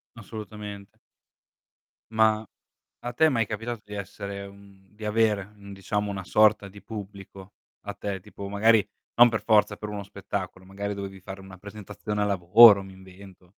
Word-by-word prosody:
Assolutamente. 105 Hz, -2 st, -9 dB, 1.1 s
Mah, 110 Hz, -1 st, +3 dB, 0.6 s
a 120 Hz, -, -3 dB
te 160 Hz, -, +4 dB
è -, -, +3 dB
mai 115 Hz, -6 st, +1 dB
capitato 115 Hz, +2 st, -5 dB
di 105 Hz, -, -10 dB
essere 100 Hz, 0 st, -6 dB
mhmm, 100 Hz, -1 st, -18 dB
di 105 Hz, 0 st, -8 dB
avere, 105 Hz, -2 st, +1 dB
un 100 Hz, 0 st, -11 dB
diciamo 105 Hz, +2 st, -2 dB
una 95 Hz, -1 st, -5 dB
sorta 105 Hz, +1 st, +3 dB
di 100 Hz, +1 st, -13 dB
pubblico 100 Hz, -2 st, -10 dB, 0.3 s
a -, -, -4 dB
te? 100 Hz, -2 st, -5 dB
Tipo 100 Hz, +2 st, -9 dB
magari 105 Hz, 0 st, +3 dB, 0.3 s
non 120 Hz, +1 st, +8 dB
per 115 Hz, -2 st, -2 dB
forza 105 Hz, -2 st, +3 dB
per 105 Hz, -, -6 dB
uno 105 Hz, -1 st, -5 dB
spettacolo, 95 Hz, -2 st, -6 dB
magari 100 Hz, +2 st, -5 dB
dovevi 100 Hz, -1 st, -7 dB
fare 95 Hz, +1 st, -8 dB
una 95 Hz, 0 st, -12 dB
presentazione 105 Hz, +1 st, -6 dB
al 105 Hz, -, +1 dB
lavoro, 100 Hz, +2 st, +7 dB
mi 95 Hz, 0 st, -12 dB
invento. 95 Hz, -1 st, -15 dB
100 Hz, 165 wpm, -26 LUFS, 95-105 Hz, 1.1 s, non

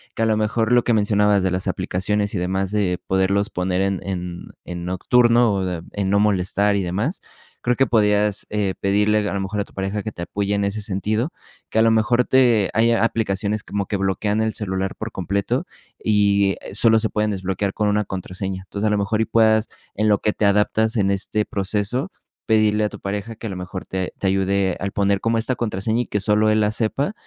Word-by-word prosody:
que -, -, -3 dB
a -, -, +4 dB
lo 110 Hz, -1 st, +2 dB
mejor 110 Hz, +1 st, 0 dB
lo 120 Hz, -1 st, +5 dB
que 120 Hz, -, +1 dB
mencionabas 105 Hz, -1 st, +3 dB
de 95 Hz, -, +2 dB
las 90 Hz, 0 st, -2 dB
aplicaciones 100 Hz, +3 st, -1 dB
y -, -, 0 dB
demás, 95 Hz, +2 st, -1 dB
de 95 Hz, -4 st, 0 dB
poderlos 95 Hz, +2 st, +1 dB
poner 90 Hz, +1 st, -1 dB
en 95 Hz, -1 st, 0 dB
en 90 Hz, -2 st, -5 dB, 0.2 s
en 85 Hz, 0 st, -6 dB
nocturno 120 Hz, +5 st, +3 dB
o 90 Hz, -3 st, -2 dB
en 100 Hz, -2 st, -2 dB
no 100 Hz, -, +3 dB
molestar 100 Hz, 0 st, +2 dB
y 100 Hz, -, 0 dB
demás. 105 Hz, -, -2 dB, 0.4 s
Creo 125 Hz, 0 st, +1 dB
que 135 Hz, -, +3 dB
podrías 105 Hz, -2 st, +2 dB, 0.3 s
pedirle 105 Hz, +1 st, +2 dB
a -, -, -2 dB
lo 100 Hz, -, -1 dB
mejor 95 Hz, +2 st, -3 dB
a -, -, +1 dB
tu -, -, -22 dB
pareja 95 Hz, +2 st, -3 dB
que 110 Hz, +1 st, -5 dB
te -, -, -8 dB
apoye 100 Hz, +3 st, -2 dB
en 100 Hz, -, 0 dB
ese 100 Hz, +2 st, -2 dB
sentido. 110 Hz, -, -1 dB, 0.4 s
Que 110 Hz, -, 0 dB
a -, -, +6 dB
lo 115 Hz, 0 st, +4 dB
mejor 120 Hz, +3 st, +3 dB
te 120 Hz, -7 st, +3 dB
haya 115 Hz, +1 st, +3 dB
aplicaciones 105 Hz, -2 st, -1 dB
como 100 Hz, -1 st, -3 dB
que 100 Hz, -, -1 dB
bloquean 100 Hz, +2 st, 0 dB
el 110 Hz, 0 st, 0 dB
celular 95 Hz, -2 st, -3 dB
por 110 Hz, 0 st, -6 dB
completo 100 Hz, -, -2 dB, 0.4 s
y 100 Hz, -2 st, +2 dB, 0.2 s
solo 110 Hz, +3 st, +5 dB
se 110 Hz, -, 0 dB
pueden 105 Hz, 0 st, 0 dB
desbloquear 95 Hz, 0 st, -2 dB
con 105 Hz, -1 st, 0 dB
1 105 Hz, 0 st, +1 dB
contraseña. 95 Hz, 0 st, -5 dB
Entonces 105 Hz, +3 st, -2 dB
a -, -, +1 dB
lo 105 Hz, -, +2 dB
mejor 100 Hz, +2 st, 0 dB
y -, -, +2 dB
puedas, 110 Hz, -1 st, +3 dB, 0.3 s
en 110 Hz, -, +1 dB
lo 105 Hz, -1 st, +3 dB
que 105 Hz, -, +1 dB
te 105 Hz, -, 0 dB
adaptas 105 Hz, +3 st, +2 dB
en 100 Hz, -3 st, +2 dB
este 105 Hz, +2 st, 0 dB
proceso, 105 Hz, -, -1 dB, 0.4 s
pedirle 110 Hz, -1 st, +3 dB
a -, -, -1 dB
tu -, -, -11 dB
pareja 105 Hz, +3 st, -4 dB
que 115 Hz, -, -7 dB
a -, -, -4 dB
lo 95 Hz, -, -5 dB
mejor 90 Hz, +1 st, -6 dB
te 95 Hz, -1 st, -4 dB
te 100 Hz, -, -2 dB
ayude 95 Hz, 0 st, +1 dB
al 100 Hz, +1 st, -3 dB
poner 100 Hz, -1 st, +1 dB
como 115 Hz, +2 st, 0 dB
esta 120 Hz, +3 st, -1 dB
contraseña 110 Hz, +1 st, -1 dB
y -, -, -11 dB
que 105 Hz, -, -2 dB
solo 105 Hz, +1 st, +3 dB
él 110 Hz, 0 st, +3 dB
la 105 Hz, -, +2 dB
sepa 120 Hz, -, -1 dB
105 Hz, 220 wpm, -21 LUFS, 95-110 Hz, 0.4 s, a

